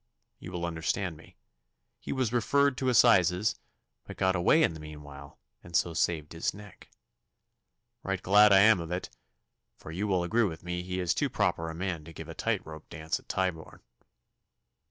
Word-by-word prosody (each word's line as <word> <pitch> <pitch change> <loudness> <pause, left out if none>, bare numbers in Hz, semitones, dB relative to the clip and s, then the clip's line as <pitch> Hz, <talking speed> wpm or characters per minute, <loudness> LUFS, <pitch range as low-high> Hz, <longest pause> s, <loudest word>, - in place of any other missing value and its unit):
You - - -9
will 85 -1 -3
understand 85 +2 -2
me. 75 - -17 0.6
He - - -7
was 130 -4 -1
referred 140 +3 +2
to 130 - +1
assizes, 105 -5 +4 0.5
but - - -10
got 95 0 +2
away 95 - +4
in - - +2
the 80 - -9
meanwhile, 75 -2 -11 0.3
and 85 - -9
so 85 - +2
saved 80 -2 -1
his 80 - -2
neck. 100 0 -14 1.1
Right 95 -1 -2
glad 105 +3 +5
I 95 -1 +7
am 110 -2 +6
of 85 -1 -6
it, 90 +1 -4 0.7
for 80 - -10
you 95 +6 -2
will 95 -3 +1
agree 110 +7 +1
with 80 -5 -5
me 90 0 -3
that 90 - -11
he 95 0 -3
is 90 -2 +1
too - - 0
proper 80 0 -1
a 80 - -7
man 85 -3 -3
to 85 - -11
give - - -9
a - - -6
tight - - -2
rope 80 -1 -11
dance 80 -1 -3
at - - -24
Tyburn. 90 -4 -3
90 Hz, 190 wpm, -29 LUFS, 80-100 Hz, 1.1 s, I